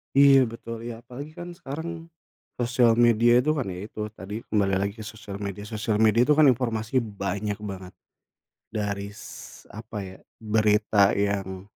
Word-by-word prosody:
Iya, 135 Hz, -2 st, +7 dB
betul 115 Hz, 0 st, -7 dB
iya. 115 Hz, -1 st, -6 dB
Apalagi 140 Hz, +6 st, -9 dB
kan 175 Hz, +1 st, -8 dB
sekarang 165 Hz, +4 st, -6 dB, 0.5 s
sosial 120 Hz, -1 st, +3 dB
media 120 Hz, +1 st, +5 dB
tuh 155 Hz, +3 st, +1 dB
kan 135 Hz, -, -1 dB
ya 90 Hz, -1 st, -5 dB
itu, 110 Hz, -, -11 dB
tadi 105 Hz, +3 st, -7 dB
kembali 100 Hz, -2 st, +1 dB
lagi, 100 Hz, +1 st, -1 dB
ke 105 Hz, -, -7 dB
sosial 105 Hz, -2 st, -8 dB
media, 100 Hz, 0 st, -5 dB
sosial 110 Hz, 0 st, -1 dB
media 110 Hz, +1 st, +4 dB
kan 150 Hz, 0 st, +6 dB
informasi 120 Hz, -1 st, +2 dB
banyak 100 Hz, -1 st, -3 dB
banget. 95 Hz, -3 st, -7 dB, 0.8 s
Dari 100 Hz, -1 st, -2 dB
s -, -, -11 dB
apa 110 Hz, +1 st, -8 dB
ya, 95 Hz, 0 st, -10 dB, 0.2 s
berita 105 Hz, -2 st, +3 dB
yang 95 Hz, -2 st, -2 dB
110 Hz, 155 wpm, -26 LUFS, 100-120 Hz, 0.8 s, Iya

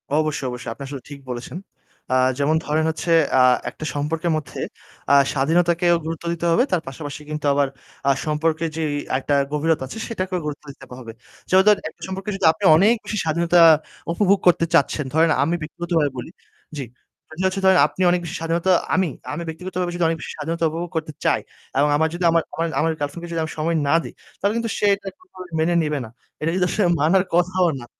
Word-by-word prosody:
অবশ্যই, 155 Hz, -3 st, 0 dB
অবশ্যই। 125 Hz, -2 st, -6 dB
আপনি 140 Hz, -, -9 dB
আসলে 135 Hz, -2 st, -7 dB
ঠিক 145 Hz, -1 st, -9 dB
বলেছেন। 125 Hz, +7 st, -6 dB, 0.6 s
আ -, -, +3 dB, 0.2 s
যেমন 145 Hz, +2 st, +2 dB
ধরেন 155 Hz, +2 st, +1 dB
হচ্ছে 160 Hz, +2 st, -3 dB, 0.3 s
আ -, -, +6 dB, 0.3 s
একটা 155 Hz, -, -8 dB
সম্পর্কের 160 Hz, +4 st, -1 dB
মধ্যে 140 Hz, -4 st, -7 dB, 0.5 s
আ -, -, +6 dB, 0.2 s
স্বাধীনতাকেও 170 Hz, +4 st, +2 dB
গুরুত্ব 165 Hz, +1 st, -5 dB
দিতে 170 Hz, 0 st, -4 dB
হবে 205 Hz, -, +4 dB
তার 180 Hz, -, +1 dB
পাশাপাশি 145 Hz, +2 st, -7 dB
কিন্তু 150 Hz, -1 st, -4 dB
আবার 140 Hz, -1 st, +2 dB, 0.4 s
আ -, -, +6 dB
সম্পর্কের 160 Hz, +1 st, 0 dB
যেই 155 Hz, -2 st, -1 dB, 0.3 s
একটা 145 Hz, -, -2 dB, 0.2 s
গভীরতা 150 Hz, -1 st, 0 dB
আছে, 130 Hz, -, -8 dB
সেটাকেও 185 Hz, -5 st, -3 dB
গুরুত্ব 150 Hz, 0 st, -5 dB
দিতে 135 Hz, -1 st, -14 dB
হবে। 115 Hz, -3 st, -8 dB, 0.4 s
যেমন 190 Hz, +1 st, +5 dB
ধরেন 210 Hz, -, +5 dB
একটা -, -, -24 dB
সম্পর্কে 190 Hz, +2 st, -5 dB
যদি 195 Hz, -, -1 dB
আপনি 205 Hz, -, -11 dB
অনেক 210 Hz, +7 st, +5 dB
বেশি 215 Hz, -, -3 dB
স্বাধীনতা 170 Hz, +2 st, +2 dB, 0.5 s
উপভোগ 200 Hz, +2 st, +3 dB
করতে 170 Hz, -1 st, +4 dB
চাচ্ছেন, 150 Hz, -1 st, +2 dB
ধরেন 160 Hz, +1 st, +4 dB
আমি 165 Hz, +4 st, 0 dB
ব্যক্তিগতভাবে 160 Hz, -1 st, -1 dB
বলি 125 Hz, -, -6 dB, 0.5 s
জি। 135 Hz, -, -4 dB, 0.5 s
আমি 155 Hz, +3 st, -6 dB
হচ্ছে 190 Hz, +1 st, 0 dB
ধরেন 190 Hz, -1 st, +6 dB
আপনি 155 Hz, +5 st, -8 dB
অনেক 180 Hz, -, +2 dB
বেশি 170 Hz, -, -5 dB
স্বাধীনতা 165 Hz, +3 st, 0 dB, 0.2 s
আমি 185 Hz, -1 st, +2 dB, 0.3 s
আমি 170 Hz, +3 st, -4 dB
ব্যক্তিগতভাবে 180 Hz, +2 st, -4 dB
যদি 175 Hz, -, -1 dB
অনেক 165 Hz, 0 st, 0 dB
বেশি -, -, -6 dB
স্বাধীনতা 165 Hz, +3 st, -3 dB
উপভোগ 170 Hz, +2 st, -4 dB
করতে 160 Hz, -1 st, -2 dB
চাই -, -, +3 dB, 0.4 s
এবং 150 Hz, -, +3 dB
আমার 160 Hz, -, +2 dB
যদি 175 Hz, +1 st, -4 dB
আমার 165 Hz, -1 st, +2 dB
আমার 165 Hz, +1 st, -1 dB
আমার 165 Hz, +1 st, +2 dB
ঐ -, -, -9 dB
girlfriend 145 Hz, +3 st, -4 dB
কে -, -, -5 dB
যদি 165 Hz, -1 st, -1 dB
আমি 160 Hz, -, -5 dB
সময় 165 Hz, +2 st, 0 dB
না 140 Hz, -, +4 dB
দিই -, -, -9 dB, 0.3 s
তাহলে 200 Hz, +1 st, +1 dB
কিন্তু 230 Hz, -1 st, -2 dB
সে -, -, 0 dB
এটা 195 Hz, 0 st, -13 dB
কোনভাবেই 185 Hz, -, -13 dB
মেনে 170 Hz, +2 st, +2 dB
নিবে 150 Hz, -1 st, -1 dB
না। -, -, -11 dB, 0.3 s
এটা 160 Hz, +2 st, 0 dB
যদি 185 Hz, -1 st, +2 dB
আসলে 205 Hz, +1 st, +1 dB
মানার 175 Hz, +6 st, +3 dB
কথাও 180 Hz, 0 st, +2 dB
না। -, -, -9 dB
165 Hz, 205 wpm, -22 LUFS, 150-180 Hz, 0.6 s, আ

